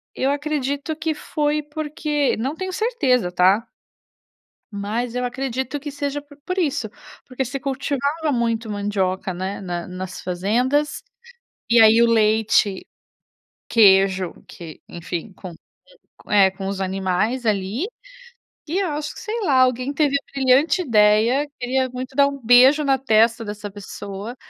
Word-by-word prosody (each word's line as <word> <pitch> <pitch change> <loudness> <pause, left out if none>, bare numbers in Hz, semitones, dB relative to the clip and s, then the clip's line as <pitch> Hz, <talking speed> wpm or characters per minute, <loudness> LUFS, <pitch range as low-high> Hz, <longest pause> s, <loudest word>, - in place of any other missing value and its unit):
Eu 265 - 0
a - - +2
eu - - +1
acredito 290 0 -3
que 320 0 -2
foi 300 0 -2
porque 295 -1 -2
não 265 +7 -3
tenho 375 +2 -4
certeza, 265 - +1
tá. 190 +6 +3 1.0
Mas 225 +4 -3
eu 250 - -1
acredito 260 +2 -3
que 290 +1 -7
seja 285 0 -3
por 285 0 -18
por 365 +1 -3
isso, 285 - 0 0.4
porque 260 +1 -3
se 255 +2 -5
cultivava 285 +3 -2
muito 230 -2 -1
mandioca, 195 -2 -2
né, 190 +3 -5
na 175 -2 -5
nas 185 +1 -7
fazendas, 245 +11 0 0.7
e 235 0 +5
aí 220 +1 +7
o 235 - +5
leite, 215 -3 +2 0.8
queijo 190 -4 +4 0.2
que 165 -3 -11
enfim, 175 +3 -6
com, 180 -3 -10 0.8
eh, 195 -2 +5
com 190 0 -6
os 195 0 -4
animais, 190 +6 -1
ali, 210 - -1 0.8
e 355 +5 -1
eu 385 -3 0
acho 300 0 -4
que, - - -10
sei 460 0 -4
lá, 275 -9 +3
alguém 255 +2 +1
teve 285 -2 +2
a 280 - -7
brilhante 275 +7 +3
ideia, 230 +3 +3
queria 260 +1 0
muito 255 +1 -7
dar 280 +1 +4
beijo 260 +5 +6
na 270 -1 +2
testa 230 -2 +2
dessa 205 0 -6
pessoa. 205 +3 -8
245 Hz, 145 wpm, -21 LUFS, 205-285 Hz, 1.0 s, aí